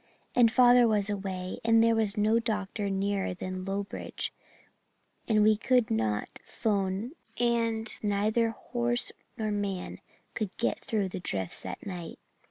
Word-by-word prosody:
And 235 Hz, -2 st, +5 dB
father 245 Hz, 0 st, +6 dB
was 210 Hz, -2 st, +2 dB
away 190 Hz, -2 st, -4 dB
and 225 Hz, 0 st, +5 dB
there 230 Hz, 0 st, +4 dB
was 220 Hz, -2 st, +1 dB
no 215 Hz, +2 st, +3 dB
doctor 210 Hz, -2 st, -2 dB
nearer 195 Hz, -1 st, -1 dB
than 185 Hz, 0 st, -5 dB
Lowbridge 195 Hz, +1 st, -4 dB, 0.9 s
and 215 Hz, -2 st, +4 dB
we 215 Hz, 0 st, +6 dB
could 245 Hz, +1 st, +2 dB
not 110 Hz, -1 st, -1 dB
'phone 200 Hz, +2 st, -1 dB, 0.3 s
and 230 Hz, -2 st, +1 dB
neither 215 Hz, +3 st, +1 dB
horse 240 Hz, +2 st, -1 dB, 0.3 s
nor 215 Hz, -2 st, -1 dB
man 200 Hz, -3 st, -3 dB, 0.3 s
could 215 Hz, -4 st, -2 dB
get 235 Hz, -, -1 dB
through 205 Hz, -4 st, -1 dB
the 185 Hz, -, -5 dB
drifts 95 Hz, -, -2 dB
that -, -, -7 dB
night. 180 Hz, -4 st, -6 dB
210 Hz, 140 wpm, -29 LUFS, 195-230 Hz, 0.9 s, father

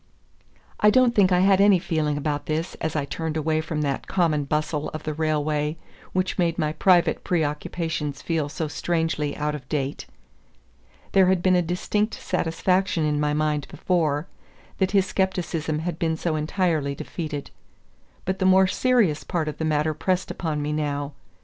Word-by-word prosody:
I 210 Hz, -, +6 dB
don't 250 Hz, +2 st, +4 dB
think 195 Hz, -4 st, +4 dB
I 180 Hz, 0 st, +4 dB
had 195 Hz, 0 st, +5 dB
any 200 Hz, -1 st, +6 dB
feeling 155 Hz, -4 st, -1 dB
about 145 Hz, 0 st, -2 dB
this 160 Hz, +3 st, -2 dB
as 160 Hz, -1 st, -2 dB
I 145 Hz, -2 st, 0 dB
turned 160 Hz, +3 st, -3 dB
away 155 Hz, 0 st, +1 dB
from 160 Hz, -1 st, -3 dB
that 140 Hz, -2 st, -2 dB
common 160 Hz, -6 st, +1 dB
bustle 150 Hz, +1 st, -1 dB
of 155 Hz, -, -6 dB
the 155 Hz, -, -3 dB
railway 150 Hz, 0 st, 0 dB, 0.3 s
which 185 Hz, +1 st, -1 dB
made 170 Hz, -2 st, +1 dB
my 155 Hz, 0 st, 0 dB
private 180 Hz, 0 st, +3 dB
preoccupations 150 Hz, -2 st, -2 dB
feel 160 Hz, -4 st, -1 dB
so 150 Hz, +3 st, -3 dB
strangely 160 Hz, -1 st, -1 dB
out 150 Hz, 0 st, -1 dB
of 135 Hz, -3 st, -8 dB
date. 140 Hz, -2 st, -2 dB, 1.0 s
There 190 Hz, -1 st, +5 dB
had 185 Hz, -1 st, +2 dB
been 185 Hz, -1 st, +4 dB
a 180 Hz, -, +4 dB
distinct 195 Hz, +5 st, -1 dB
satisfaction 180 Hz, 0 st, 0 dB
in 150 Hz, -1 st, 0 dB
my 150 Hz, 0 st, +1 dB
mind 150 Hz, -1 st, 0 dB
before, 155 Hz, -4 st, 0 dB, 0.5 s
that 190 Hz, -1 st, +2 dB
his 195 Hz, -1 st, +3 dB
scepticism 175 Hz, -5 st, -1 dB
had 160 Hz, +1 st, -4 dB
been 160 Hz, -1 st, 0 dB
so 165 Hz, -1 st, -1 dB
entirely 155 Hz, -2 st, 0 dB
defeated. 150 Hz, -2 st, -5 dB, 0.7 s
But 190 Hz, +1 st, -2 dB
the 190 Hz, -, +3 dB
more 190 Hz, 0 st, +6 dB
serious 205 Hz, -, +2 dB
part 165 Hz, -3 st, -2 dB
of 150 Hz, -1 st, -5 dB
the 160 Hz, -, -1 dB
matter 155 Hz, 0 st, +1 dB
pressed 185 Hz, +4 st, -1 dB
upon 155 Hz, -4 st, -2 dB
me 150 Hz, +1 st, -2 dB
now. 145 Hz, -1 st, -2 dB
160 Hz, 170 wpm, -24 LUFS, 150-180 Hz, 1.0 s, I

